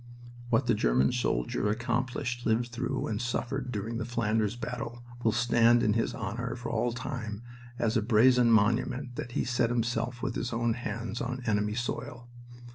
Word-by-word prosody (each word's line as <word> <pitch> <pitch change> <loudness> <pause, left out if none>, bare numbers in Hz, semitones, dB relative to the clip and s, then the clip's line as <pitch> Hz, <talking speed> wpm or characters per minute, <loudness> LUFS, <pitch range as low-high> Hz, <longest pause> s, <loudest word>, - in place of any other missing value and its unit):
"What 120 +2 +3
the 120 - +3
German 65 - +3
soldier 105 - 0
accomplished, 120 +2 -1
lived 115 +2 +1
through, 125 +3 -2
and 105 0 -2
suffered 125 +2 -2
during 110 +2 -3
the - - -1
Flanders 110 -2 0
battle 120 0 -5 0.2
will 110 - +4
stand 120 +1 +4
in 105 - +3
his 115 +1 0
honor 115 +4 -3
for 120 -1 -5
all 120 - +1
time 115 -3 -5 0.3
as 115 0 0
a 115 - +3
brazen 120 +2 +5
monument 120 +4 +2
that 120 - -5
he - - +1
set 120 -1 +1
himself 120 0 -1
with 135 -3 -1
his 120 +2 -3
own 115 0 +1
hands 115 -1 -4
on 125 +1 -3
enemy 105 -2 +1
soil! 120 0 -4
120 Hz, 170 wpm, -29 LUFS, 110-125 Hz, 0.3 s, brazen